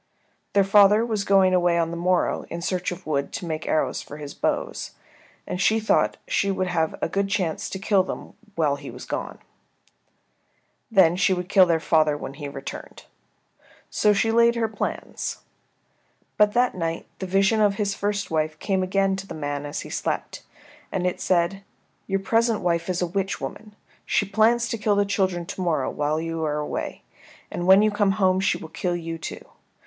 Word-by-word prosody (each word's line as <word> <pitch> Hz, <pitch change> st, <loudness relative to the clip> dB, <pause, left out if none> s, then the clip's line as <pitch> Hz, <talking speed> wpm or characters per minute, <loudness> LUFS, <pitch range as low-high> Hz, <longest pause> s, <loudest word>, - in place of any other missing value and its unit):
Their 200 Hz, -, +5 dB
father 205 Hz, +3 st, +5 dB
was 215 Hz, -4 st, -1 dB
going 195 Hz, -2 st, +4 dB
away 175 Hz, -1 st, +3 dB
on 165 Hz, -1 st, 0 dB
the -, -, -4 dB
morrow 180 Hz, +1 st, 0 dB
in 170 Hz, +1 st, -5 dB
search 180 Hz, 0 st, -1 dB
of 180 Hz, -, -8 dB
wood 140 Hz, -2 st, -1 dB
to -, -, -4 dB
make 160 Hz, -2 st, -4 dB
arrows 155 Hz, -, 0 dB
for 150 Hz, -, -10 dB
his 145 Hz, -1 st, -8 dB
bows, -, -, -2 dB, 0.5 s
and 180 Hz, -, -3 dB
she 220 Hz, +3 st, +3 dB
thought 220 Hz, -, +2 dB
she -, -, +1 dB
would 190 Hz, -1 st, 0 dB
have 165 Hz, -3 st, 0 dB
a -, -, +2 dB
good 195 Hz, +4 st, -1 dB
chance 185 Hz, -5 st, -1 dB
to -, -, -5 dB
kill 195 Hz, 0 st, +3 dB
them 185 Hz, -, -6 dB, 0.2 s
while 150 Hz, -4 st, +1 dB
he 140 Hz, -1 st, -9 dB
was -, -, -9 dB
gone. -, -, -4 dB, 1.5 s
Then 190 Hz, -6 st, +5 dB
she 185 Hz, 0 st, +2 dB
would 180 Hz, 0 st, -4 dB
kill 190 Hz, -3 st, +6 dB
their 165 Hz, -1 st, +2 dB
father 155 Hz, -2 st, +2 dB
when 135 Hz, -, -7 dB
he 145 Hz, 0 st, -7 dB
returned. 135 Hz, -1 st, -8 dB, 0.9 s
So 210 Hz, -, +3 dB
she 215 Hz, +2 st, +2 dB
laid 235 Hz, +1 st, +4 dB
her 230 Hz, -1 st, +1 dB
plans. 215 Hz, -1 st, -4 dB, 0.9 s
But 210 Hz, 0 st, +4 dB
that 245 Hz, +1 st, +2 dB
night 165 Hz, -2 st, -3 dB
the 190 Hz, -, -4 dB
vision 195 Hz, +4 st, +3 dB
of 205 Hz, -1 st, +3 dB
his 200 Hz, -1 st, -1 dB
first 205 Hz, -1 st, -2 dB
wife 155 Hz, -1 st, 0 dB
came 190 Hz, +3 st, 0 dB
again 195 Hz, +1 st, +1 dB
to 195 Hz, 0 st, -7 dB
the -, -, -7 dB
man 145 Hz, -1 st, -4 dB
as 145 Hz, -, -4 dB
he -, -, -9 dB
slept, -, -, -3 dB, 0.5 s
and 180 Hz, -, -1 dB
it 180 Hz, -, -1 dB
said, 185 Hz, +2 st, +1 dB, 0.5 s
"Your 195 Hz, 0 st, 0 dB
present 230 Hz, +2 st, +1 dB
wife 170 Hz, 0 st, 0 dB
is 180 Hz, 0 st, 0 dB
a -, -, +2 dB
witch 195 Hz, +2 st, -2 dB
woman. 210 Hz, -1 st, -7 dB, 0.3 s
She 205 Hz, -, +2 dB
plans 225 Hz, +4 st, +3 dB
to 230 Hz, -, -3 dB
kill 205 Hz, -1 st, +2 dB
the 205 Hz, 0 st, +2 dB
children 190 Hz, -3 st, 0 dB
to 185 Hz, -, -6 dB
morrow 160 Hz, -7 st, 0 dB
when 150 Hz, +2 st, -1 dB
you 165 Hz, -1 st, -3 dB
are 150 Hz, -1 st, -1 dB
away, 150 Hz, -, -4 dB, 0.5 s
and 175 Hz, -, -3 dB
when 190 Hz, +2 st, +7 dB
you 215 Hz, -, +3 dB
come 205 Hz, -1 st, +2 dB
home 190 Hz, -2 st, +2 dB
she 195 Hz, -, +1 dB
will 160 Hz, -, -9 dB
kill 175 Hz, +1 st, -2 dB
you, 165 Hz, -1 st, -5 dB
too. -, -, -7 dB
185 Hz, 195 wpm, -24 LUFS, 165-200 Hz, 1.5 s, when